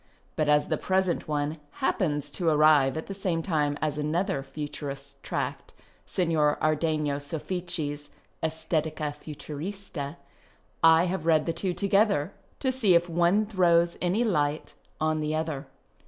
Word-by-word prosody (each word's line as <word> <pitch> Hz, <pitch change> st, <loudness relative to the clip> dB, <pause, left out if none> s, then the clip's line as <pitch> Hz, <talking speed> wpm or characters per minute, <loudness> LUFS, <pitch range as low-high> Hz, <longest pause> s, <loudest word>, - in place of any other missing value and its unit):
But 155 Hz, -1 st, +1 dB
as 150 Hz, 0 st, +3 dB
the 155 Hz, -, +1 dB
present 190 Hz, -2 st, 0 dB
one 150 Hz, +1 st, -1 dB, 0.2 s
hajipcns 150 Hz, -, 0 dB
to 170 Hz, -2 st, +1 dB
arrive 150 Hz, -2 st, +5 dB
at 160 Hz, -, -4 dB
the 195 Hz, -, -6 dB
same 180 Hz, -4 st, -1 dB
time 150 Hz, -5 st, 0 dB
as 150 Hz, -1 st, -1 dB
another 170 Hz, +3 st, 0 dB
Futurist 140 Hz, -1 st, -7 dB
tract -, -, -4 dB, 0.2 s
— -, -, -34 dB
Signor 160 Hz, -5 st, +2 dB
Ardcngo 155 Hz, -2 st, 0 dB
Soffici's 155 Hz, -1 st, -4 dB, 0.2 s
" -, -, -40 dB
Estetica 155 Hz, -1 st, -1 dB
Futurista 155 Hz, +1 st, -6 dB, 0.2 s
" -, -, -32 dB
— -, -, -38 dB
I 165 Hz, 0 st, +7 dB
have 180 Hz, -2 st, -2 dB
read 155 Hz, -2 st, +4 dB
the 165 Hz, -, 0 dB
two 180 Hz, +2 st, -2 dB
together, 200 Hz, -4 st, +2 dB, 0.3 s
to 260 Hz, -, +1 dB
see 220 Hz, -9 st, +3 dB
if 170 Hz, +1 st, +3 dB
one 175 Hz, +5 st, +3 dB
throws 175 Hz, -4 st, +3 dB
any 185 Hz, +6 st, +2 dB
light 150 Hz, -8 st, 0 dB, 0.3 s
on 155 Hz, 0 st, +1 dB
the 155 Hz, 0 st, -1 dB
other. 155 Hz, -3 st, -3 dB
160 Hz, 155 wpm, -27 LUFS, 150-180 Hz, 0.3 s, I